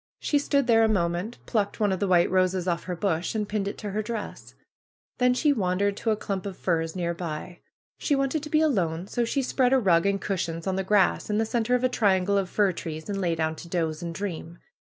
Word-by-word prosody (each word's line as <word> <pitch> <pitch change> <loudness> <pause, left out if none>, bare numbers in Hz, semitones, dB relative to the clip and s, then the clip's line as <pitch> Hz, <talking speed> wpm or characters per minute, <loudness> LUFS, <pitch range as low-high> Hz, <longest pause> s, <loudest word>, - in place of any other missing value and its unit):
She 290 - +1
stood 280 -1 +1
there 225 -2 +5
a - - +5
moment, 180 +2 -1
plucked 210 -2 -1
one 210 -2 +2
of 190 - -1
the 200 - 0
white 175 -2 +4
roses 185 -1 +1
off 170 -1 -1
her 180 - -3
bush, 175 +1 -1
and 210 -1 -1
pinned 205 -1 -2
it 200 - -4
to 205 - -5
her 210 +2 -1
dress. 215 0 -6 0.6
Then 250 0 +4
she 295 +2 +3
wandered 200 -2 0
to 230 - -2
a 215 - +3
clump 195 -1 -4
of 190 - -7
firs 165 -2 -1
near 170 -2 -1
by. 170 +1 -6 0.4
She 290 - +1
wanted 275 +2 0
to 300 - -7
be 310 0 +3
alone; 180 - +1
so 240 +4 -1
she 275 +4 -1
spread 255 0 +2
a - - +6
rug 185 -6 +3
and 200 0 +1
cushions 170 -5 -3
on 190 -1 0
the 190 - -1
grass 195 0 +2
in 210 - +1
the 225 - +2
center 235 +1 +1
of 250 - -1
a - - +5
triangle 200 -5 +2
of 190 -2 -3
fir 205 -1 +2
trees, 160 0 -7
and 195 -1 -2
lay 170 -2 +1
down 160 0 -1
to 175 - -9
doze 165 -3 -1
and 170 -1 -5
dream. 170 -3 -5
195 Hz, 245 wpm, -26 LUFS, 175-225 Hz, 0.6 s, a